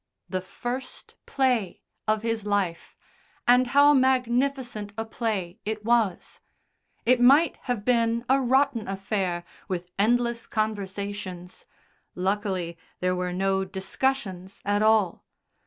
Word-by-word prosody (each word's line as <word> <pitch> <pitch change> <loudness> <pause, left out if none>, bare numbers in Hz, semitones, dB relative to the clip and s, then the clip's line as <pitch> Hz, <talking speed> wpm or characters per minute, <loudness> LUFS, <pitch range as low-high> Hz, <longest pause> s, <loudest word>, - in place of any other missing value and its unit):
The 185 -1 -2
first 245 +7 -6
play 250 -8 0 0.3
of 215 0 +1
his 225 -2 -1
life, 200 -5 -1 0.5
and 250 +1 +5
how 285 +3 +6
magnificent 255 -4 +1
a 225 - -2
play 215 -6 -3
it 215 0 -4
was! 225 -6 +1 0.7
It 250 +1 +4
might 280 +5 +5
have 240 -5 -2
been 235 -1 +2
a 270 +1 +3
rotten 260 -2 +2
affair 190 -2 -2 0.2
with 180 -2 -4
endless 235 +2 +1
conversations 200 -3 -4 0.5
luckily 185 -3 -2 0.2
there 180 0 +1
were 180 0 -2
no 190 +1 +1
discussions 190 0 -2
at 205 0 +1
all. 215 -5 +3
215 Hz, 115 wpm, -26 LUFS, 190-245 Hz, 0.7 s, how